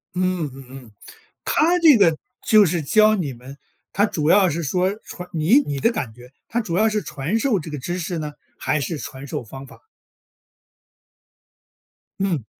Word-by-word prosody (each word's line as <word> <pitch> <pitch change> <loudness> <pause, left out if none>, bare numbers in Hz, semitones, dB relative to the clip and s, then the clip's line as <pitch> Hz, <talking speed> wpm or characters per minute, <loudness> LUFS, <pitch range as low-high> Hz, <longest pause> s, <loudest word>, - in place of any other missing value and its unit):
嗯 180 -4 -1
嗯 135 0 -12
嗯。 130 -4 -12 0.5
她 340 +3 +2
这 315 -7 +7
个 170 -7 +4 0.3
就 215 -2 +7
是 170 -1 0
教 215 +8 +4
你 155 -9 -3
们， 130 +3 -12 0.4
她 205 +2 +3
主 155 -7 -1
要 190 0 +5
是 170 +2 -3
说 180 +6 0
传 180 0 -9
你 170 - +4
你 145 - -3
的 230 - +2
感 130 - -4
觉， 125 +3 -15 0.2
她 235 - -1
主 175 -5 -3
要 220 +2 +4
是 210 -1 -1
传 155 +5 -3
授 225 -4 +1
这 160 - -8
个 150 - -5
知 175 +7 -4
识 175 0 -3
呢， 150 -2 -5 0.2
还 155 - -1
是 145 +4 -3
传 135 -1 -8
授 125 - -4
方 135 +4 -10
法？ - - -16 2.4
嗯。 175 - -1
170 Hz, 190 characters per minute, -22 LUFS, 140-205 Hz, 2.4 s, 这